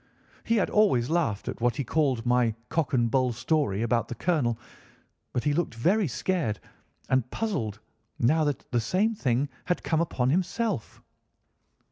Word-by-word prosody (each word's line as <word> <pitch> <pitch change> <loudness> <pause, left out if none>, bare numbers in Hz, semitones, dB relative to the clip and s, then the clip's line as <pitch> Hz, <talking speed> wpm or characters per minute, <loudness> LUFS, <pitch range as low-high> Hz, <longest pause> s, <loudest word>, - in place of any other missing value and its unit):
He 230 - +1
had 205 - +1
always 155 - +3
laughed 155 - 0
at - - -5
what 120 -1 +2
he 140 - -2
called 130 -3 0
my 120 -2 +2
cock 160 -5 0
and 120 -3 +2
bull 130 -2 +2
story 115 -4 0
about 115 0 +1
the 120 - -6
colonel, 125 -6 0 0.7
but 120 - -2
he 145 - +2
looked 160 -6 -1
very 185 - +2
scared 145 - -1 0.5
and 130 -2 +1
puzzled 115 - -2 0.4
now 155 +7 +3
that 145 -3 -2
the 120 - +2
same 195 - +1
thing 135 - 0 0.2
had 180 - -1
come 160 -1 +1
upon 130 -6 0
himself. 185 - -1
135 Hz, 160 wpm, -27 LUFS, 120-175 Hz, 0.7 s, always